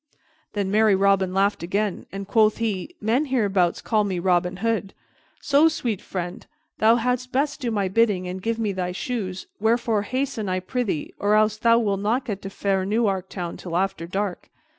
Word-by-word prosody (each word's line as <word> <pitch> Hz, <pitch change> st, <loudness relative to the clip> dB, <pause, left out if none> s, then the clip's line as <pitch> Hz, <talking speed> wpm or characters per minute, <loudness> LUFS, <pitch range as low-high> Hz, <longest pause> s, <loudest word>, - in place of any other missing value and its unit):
Then 200 Hz, -2 st, -1 dB
merry 215 Hz, -1 st, +4 dB
Robin 195 Hz, -1 st, +3 dB
laughed 195 Hz, +2 st, +1 dB
again, 200 Hz, +3 st, -2 dB
and 195 Hz, 0 st, -6 dB
quoth 215 Hz, 0 st, +3 dB
he, 225 Hz, -, -3 dB
"Men 235 Hz, +8 st, +1 dB
hereabouts 200 Hz, -, +1 dB
call 215 Hz, -2 st, +2 dB
me 195 Hz, -3 st, -2 dB
Robin 180 Hz, 0 st, +1 dB
Hood; 220 Hz, -4 st, -1 dB, 0.4 s
so, 290 Hz, +2 st, +4 dB
sweet 240 Hz, -, -2 dB
friend, 175 Hz, -2 st, -5 dB, 0.4 s
thou 220 Hz, +2 st, +6 dB
hadst 250 Hz, +1 st, -1 dB
best 280 Hz, +2 st, 0 dB
do 245 Hz, -, -1 dB
my 205 Hz, -4 st, 0 dB
bidding 195 Hz, -2 st, +2 dB
and 185 Hz, +1 st, -5 dB
give 230 Hz, +3 st, -1 dB
me 220 Hz, -3 st, 0 dB
thy 180 Hz, -1 st, -3 dB
shoes, 190 Hz, -4 st, -4 dB
wherefore 230 Hz, -1 st, +2 dB
hasten, 255 Hz, -2 st, -2 dB
I 185 Hz, 0 st, 0 dB
prythee, 195 Hz, -, -3 dB
or 205 Hz, +1 st, +3 dB
else 215 Hz, 0 st, +3 dB
thou 230 Hz, +1 st, +4 dB
wilt 205 Hz, -4 st, 0 dB
not 235 Hz, +6 st, 0 dB
get 200 Hz, -3 st, -4 dB
to 195 Hz, -, -6 dB
fair 195 Hz, -1 st, 0 dB
Newark 195 Hz, -2 st, 0 dB
Town 175 Hz, -3 st, -5 dB
till 170 Hz, -2 st, -4 dB
after 185 Hz, -3 st, -1 dB
dark." 195 Hz, 0 st, -3 dB
205 Hz, 185 wpm, -24 LUFS, 190-230 Hz, 0.4 s, thou